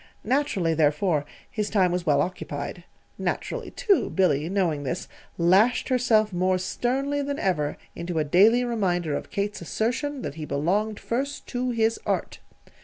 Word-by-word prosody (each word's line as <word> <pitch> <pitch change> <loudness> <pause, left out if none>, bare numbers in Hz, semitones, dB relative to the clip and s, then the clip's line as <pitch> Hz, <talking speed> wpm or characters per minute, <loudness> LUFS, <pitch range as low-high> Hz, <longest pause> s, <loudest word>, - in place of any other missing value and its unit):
Naturally, 225 - +1
therefore, 150 0 +2 0.3
his 210 -2 -2
time 185 -4 +3
was 180 -1 -2
well 145 -1 +4
occupied. 180 +3 -5 0.3
Naturally, - - -3
too, 420 -8 +2
Billy, 160 -5 +2
knowing 180 -7 0
this, 145 +6 -3 0.3
lashed 190 +11 +4
herself 225 -5 +3
more 185 +1 +2
sternly 270 +9 -1
than 285 0 -2
ever 150 - 0 0.2
into 170 0 -4
a 155 - +3
daily 210 +11 +5
reminder 180 -10 0
of - - -5
Kate's 205 0 -2
assertion 250 - -2
that - - -4
he - - -3
belonged 190 +10 0
first 275 +4 -3
to 250 0 -1
his 225 -1 +1
Art. - - -2
200 Hz, 150 wpm, -25 LUFS, 170-245 Hz, 0.3 s, daily